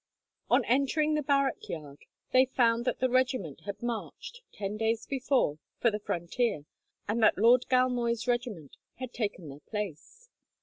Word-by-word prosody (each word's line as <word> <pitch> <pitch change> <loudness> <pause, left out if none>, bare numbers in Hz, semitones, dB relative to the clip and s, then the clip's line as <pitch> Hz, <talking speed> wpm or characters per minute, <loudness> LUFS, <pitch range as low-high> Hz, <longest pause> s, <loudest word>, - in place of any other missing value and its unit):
On - - +4
entering 280 +5 +2
the 305 - +1
barrack 275 -2 0
yard, 145 -3 -7 0.3
they 255 +1 +6
found 235 -2 +2
that - - -1
the 260 - +4
regiment 255 - 0
had 200 +3 -6
marched, 240 - -5
ten 200 0 -4
days 225 +1 0
before, 260 - 0 0.2
for 235 - +3
the 210 - -3
frontier, 175 - -1 0.4
and 220 +3 0
that 215 - +5
Lord 240 +4 +5
Galmoy's 245 -2 +1
regiment 240 - -2 0.2
had 255 -1 -7
taken 205 -7 -3
their 140 +1 -10
place. 210 - -6
235 Hz, 150 wpm, -29 LUFS, 205-255 Hz, 0.4 s, they